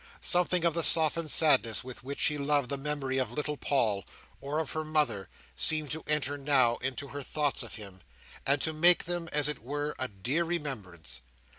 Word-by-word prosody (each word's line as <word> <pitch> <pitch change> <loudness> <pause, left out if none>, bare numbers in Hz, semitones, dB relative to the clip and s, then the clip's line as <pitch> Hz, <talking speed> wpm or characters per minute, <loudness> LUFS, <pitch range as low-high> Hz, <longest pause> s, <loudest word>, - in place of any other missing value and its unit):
Something 180 -1 +2
of 170 - +2
the 170 - -1
softened 160 0 +5
sadness 135 -9 +4
with 125 -2 -10
which 140 +2 -7
she 150 - +3
loved 140 -2 0
the 140 - -2
memory 135 -2 -3
of 130 - -2
little 150 0 -3
Paul, 110 -9 -1 0.4
or 140 +2 -4
of 160 - -3
her 155 -1 -3
mother, 150 - -1 0.3
seemed 155 -3 +2
to 160 +1 -5
enter 145 -1 0
now 130 -4 +2
into 135 +1 -5
her 145 - -6
thoughts 145 +1 -1
of 115 - -7
him, 100 -4 -11 0.4
and 140 +1 +1
to 160 - -1
make 175 +3 +6
them, 175 -1 -3
as 145 -1 +2
it 150 - -2
were, 145 +5 -4
a 130 - -2
dear 125 - -2
remembrance. 105 - -6
145 Hz, 190 wpm, -29 LUFS, 130-155 Hz, 0.4 s, make